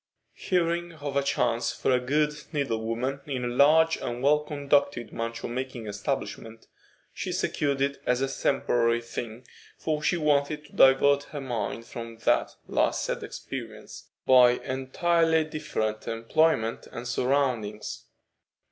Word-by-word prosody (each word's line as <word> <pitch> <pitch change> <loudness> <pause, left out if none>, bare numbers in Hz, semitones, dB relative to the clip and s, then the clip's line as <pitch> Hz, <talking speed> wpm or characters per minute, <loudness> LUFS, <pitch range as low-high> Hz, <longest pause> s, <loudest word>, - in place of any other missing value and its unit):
Hearing 175 -1 -1
of 145 -3 -6
a 140 - +3
chance 140 -4 0
for - - -1
a 125 - +4
good 150 +4 +1 0.2
needle 135 -8 -1
woman 125 +5 -2
in 130 -3 -2
a - - 0
large 155 +6 +4
and 120 +1 -5
well 150 +2 +5
conducted 140 -5 0
mantua 115 0 -4
making 125 -1 -5
establishment, 110 +2 -4 0.5
she - - -4
secured 140 -2 -1
it 140 0 0
as 125 0 +2
a 135 - +1
temporary 120 -4 +1
thing, 120 0 -7 0.3
for 155 -1 -2
she 175 +3 +1
wanted 150 -1 +1
to - - -19
divert 140 +1 +5
her 150 - -7
mind 115 -3 -3
from 115 -1 -8
that - - +2
last - - +1
sad - - -3
experience 115 -5 -8 0.2
by 125 -2 +7
entirely 160 +6 +1
different 130 -9 -3
employment 115 +1 +1
and 120 +1 -6
surroundings. 125 -5 -1
135 Hz, 140 wpm, -27 LUFS, 115-150 Hz, 0.5 s, by